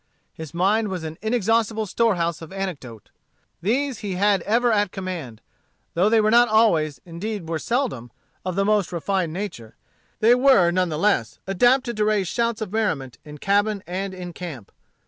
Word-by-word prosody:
His 160 -2 -8
mind 200 +6 +1
was 185 -4 -4
an 160 0 -7
inexhaustable 220 0 +1
store 225 +2 +1
house 170 -1 -2
of 165 - -10
anecdote. 155 - -6 0.5
These 255 +6 0
he 195 -3 -4
had 200 0 +2
ever 235 +2 +3
at 205 -3 +1
command. 170 - -6 0.5
Though 185 +5 +3
they 225 0 +4
were 215 0 +3
not 240 +1 +6
always, 175 -10 +2
indeed 180 +2 -5
were 165 -1 -2
seldom, 230 - -2 0.3
of 185 -1 -3
the 195 0 +1
most 210 -3 +1
refined 175 0 -1
nature, 170 - -6 0.4
they 225 +2 +6
were 250 -9 +5
none 180 0 +1
the 155 - -3
less 160 - +1
adapted 240 +5 +2
to 210 - +2
raise 210 -3 +1
shouts 230 +2 -1
of 210 -2 -5
merriment 155 - -1
in 150 0 -10
cabin 200 +3 +1
and 185 0 -5
camp. 155 - -8
195 Hz, 170 wpm, -23 LUFS, 170-220 Hz, 0.5 s, not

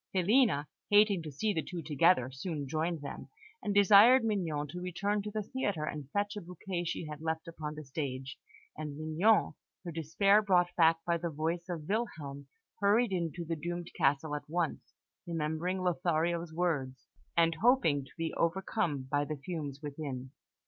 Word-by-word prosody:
Filina, 190 - +3 0.2
hating 205 -3 +5
to 155 -2 -7
see 205 +10 0
the 160 - 0
two 170 +1 -6
together, 150 -3 +3
soon 145 +1 -4
joined 160 +3 -1
them, 140 - -7 0.3
and 205 - -2
desired 205 +5 +7
Mignon 170 -9 -1
to 175 +4 -6
return 200 +4 -1
to 210 - -5
the 215 0 -3
theatre 200 -9 -2
and 150 -3 -5
fetch 205 +4 -1
a 205 - -5
bouquet 175 +1 -5
she 165 - -3
had 150 0 -7
left 160 +1 -3
upon 155 -2 -6
the 155 - -7
stage; 135 -2 -5 0.4
and 150 -2 -6
Mignon, 160 +8 +2 0.3
her 170 - -4
despair 165 +6 +3
brought 180 -4 +2
back 165 -1 +4
by 170 -1 +1
the 170 +1 -3
voice 165 +4 -3
of 160 -4 -5
Wilhelm, 150 -11 -3 0.3
hurried 210 +3 +3
into 170 -1 -2
the 165 +1 -2
doomed 175 +2 -5
castle 145 +2 +1
at 145 0 -5
once, 170 -1 -2 0.4
remembering 170 +3 -2
Lothario's 170 -1 0
words, 150 -6 -2 0.3
and 165 0 +4
hoping 225 - +4
to 135 - -16
be 165 -1 -2
overcome 170 -4 0
by 145 +2 0
the 150 +1 -4
fumes 145 -2 -5
within. 140 -3 -5
165 Hz, 170 wpm, -32 LUFS, 150-190 Hz, 0.4 s, desired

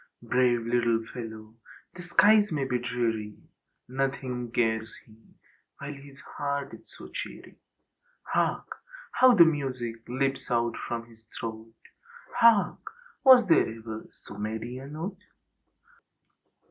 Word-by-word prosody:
Brave 125 -1 +2
little 115 -1 +1
fellow! 110 -2 -8 0.4
The 180 - -9
skies 205 +4 +4
may 145 -3 -1
be 125 -2 -1
dreary. 115 -4 -2 0.5
Nothing 130 -2 -3
cares 110 -2 0
he 110 - -18 0.6
while 140 +1 -6
his 140 0 -14
heart 140 0 -4
is - - -13
so - - -10
cheery. - - -8 0.6
Hark! - - -1 0.3
How 255 -1 +6
the 170 -4 +9
music 130 -7 -2
leaps 135 +2 -1
out 120 -2 +1
from 115 -1 -3
his 115 -1 -20 0.2
throat! 115 0 -6 0.6
Hark! 220 -6 +5 0.4
Was 260 -3 +8
there 165 - +4
ever 110 -1 -8
so 100 - -13
merry 110 +4 -4
a 135 - -9
note? 165 +6 -6
125 Hz, 120 wpm, -28 LUFS, 115-145 Hz, 0.6 s, the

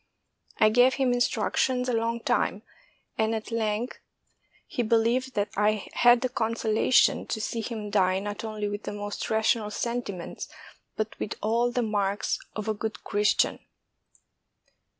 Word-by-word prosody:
I 215 - +6
gave 245 +4 +5
him 260 -3 +2
instructions 245 +2 +1
a 250 - 0
long 230 +1 0
time, - - 0 0.6
and 220 +1 +2
at 220 +1 -5
length 225 +1 -1 0.7
he - - -2
be 230 0 +2
lieved, 240 +3 +1
and 205 0 +2
I 210 0 +1
had 240 0 +5
the 255 - 0
consolation 225 0 +2
to 220 - -2
see 225 +1 -2
him 215 -2 -5
die 185 -2 +3
not 205 +2 -4
only 215 -2 -3
with 205 0 -4
the - - -5
most 205 0 -4
rational 220 0 +2
sentiments, 210 -5 -4 0.5
but 215 0 -4
with 215 - -3
all 235 +3 +2
the 245 0 0
marks 205 -2 0 0.2
of 215 0 -4
a 220 - +1
good 220 +1 -5
Christian. 205 -1 +2
220 Hz, 150 wpm, -27 LUFS, 210-235 Hz, 0.7 s, I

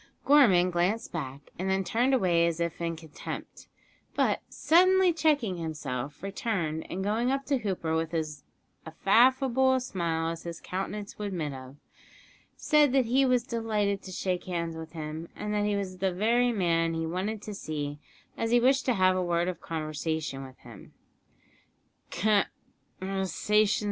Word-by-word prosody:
Gorman 195 -12 +5
glanced 180 +6 0
back, 140 -4 -6
and 190 +1 -1
then 190 0 +1
turned 240 +7 +1
away 175 -7 +3
as 170 -1 -2
if 170 0 -2
in 165 -1 -1
contempt, 160 -2 -8 0.5
but, - - +1
suddenly 370 +2 +4
checking 295 - +1
himself, 150 -4 -5
returned, 190 -6 -2
and 190 +2 -3
going 220 +5 +1
up 275 +1 -1
to 275 -2 +1
Hooper 185 -7 -2
with 160 0 -1
as 155 -4 -3 0.6
affable 260 +4 +4
a - - +2
smile 165 -8 -2
as 165 0 -6
his 170 -1 -7
countenance 200 +3 -5
would 210 - -2
admit 165 -7 -3
of, 130 0 -10 0.8
said 295 -3 +3
that 265 -2 +4
he 260 +4 +3
was 250 -2 +3
delighted 215 -4 -1
to 190 - -9
shake 180 0 -2
hands 170 -2 -3
with 160 0 -8
him, 160 +1 -6
and 210 0 -4
that 205 0 +1
he 210 0 +1
was 185 -2 -4
the 190 0 +1
very 235 +6 +2
man 165 -5 +1
he 165 0 -2
wanted 190 +6 -2
to 210 - -6
see, 150 -6 -4 0.4
as 225 - -2
he 240 +1 +5
wished 265 +2 +3
to 250 - +3
have 185 -1 +4
a 185 - 0
word 175 -1 0
of 185 - -4
conversation 155 -3 -3
with 130 -1 -12
him. 115 -5 -13
185 Hz, 160 wpm, -28 LUFS, 165-230 Hz, 0.8 s, Gorman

